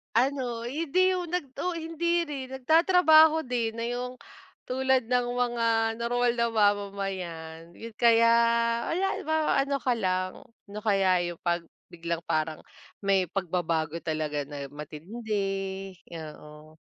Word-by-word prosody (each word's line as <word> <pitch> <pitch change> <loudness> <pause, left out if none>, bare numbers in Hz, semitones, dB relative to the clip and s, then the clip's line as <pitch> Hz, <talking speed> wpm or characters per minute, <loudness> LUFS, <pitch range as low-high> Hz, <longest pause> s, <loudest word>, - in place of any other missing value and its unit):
Ano, 245 -2 0
hindi 335 +7 +1
yung 350 -2 -4
nag 295 -8 -3
oo, 360 - -2
hindi 335 +1 -1
rin. 270 -3 -6
Nagtatrabaho 320 +2 +5
din 230 -2 -2
na 230 - -2
yung 250 +1 -4 0.5
tulad 260 -1 +1
ng 250 0 +2
mga 240 -1 0 0.3
normal 245 +1 +1
na 235 0 +2
mamamayan 195 -6 -1 0.3
kaya 230 -1 +5 0.6
wala 365 +4 0 0.2
ma 315 +1 +1 0.3
ano 280 0 -1
ka 250 - +2
lang, 185 -3 -2 0.2
ano 205 +1 -7
kaya 190 -4 +3
yung 170 - -11
'pag 175 -1 0 0.3
biglang 170 -1 -3
parang 155 0 -1 0.4
may 195 -1 +3
pagbabago 170 -4 -1
talaga 155 -2 -2
na 145 -1 -6
matindi, 160 +10 -8 0.8
oo. 155 -1 -10
230 Hz, 125 wpm, -27 LUFS, 170-265 Hz, 0.8 s, Nagtatrabaho